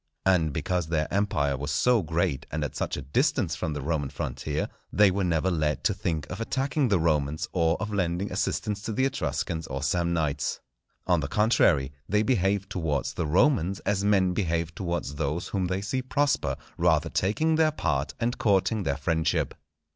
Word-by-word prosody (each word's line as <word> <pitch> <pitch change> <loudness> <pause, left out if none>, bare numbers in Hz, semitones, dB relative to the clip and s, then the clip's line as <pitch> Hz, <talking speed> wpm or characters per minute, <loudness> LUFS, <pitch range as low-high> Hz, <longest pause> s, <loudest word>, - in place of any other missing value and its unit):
And 90 -5 +3
because 90 +3 -1
their 80 -2 0
empire 75 -9 +1
was 70 +2 -4
so 115 - +3
great, 80 -3 -1
and 75 -1 -2
at 75 - -4
such - - -2
a 70 - -5
distance 70 +2 +1
from 80 - -3
the 75 -2 -4
Roman 75 -2 -1
frontier, 75 +2 -3 0.2
they 105 -2 +5
were 100 +1 -1
never 90 +1 +1
led 75 -3 0
to - - +2
think 80 -3 -3
of 100 +4 -5
attacking 135 +4 0
the 100 -4 +3
Romans 75 -2 0
or 85 -1 +2
of 105 0 -4
lending 90 0 -1
assistance 100 +2 -1
to 110 - -4
the 130 +4 +2
Etruscans 80 - -2
or 70 +1 -4
Samnites. 85 -1 0 0.5
On 90 -2 +3
the 75 - -2
contrary, 85 - +3 0.2
they 105 +3 +3
behaved 100 -4 +1
towards 75 -7 -1
the 85 - -2
Romans 95 - +2
as 100 -1 0
men 95 -3 +3
behave 85 -3 -1
towards 85 -4 -3
those 75 +2 -2
whom 95 -3 -1
they 95 +2 -1
see 130 +6 -2
prosper, 140 +2 0 0.2
rather - - +2
taking 155 +13 +1
their 160 0 +4
part 75 - -1
and 120 +1 -1
courting 105 -2 +2
their 70 -6 -1
friendship. 80 +3 0
85 Hz, 180 wpm, -27 LUFS, 75-100 Hz, 0.5 s, they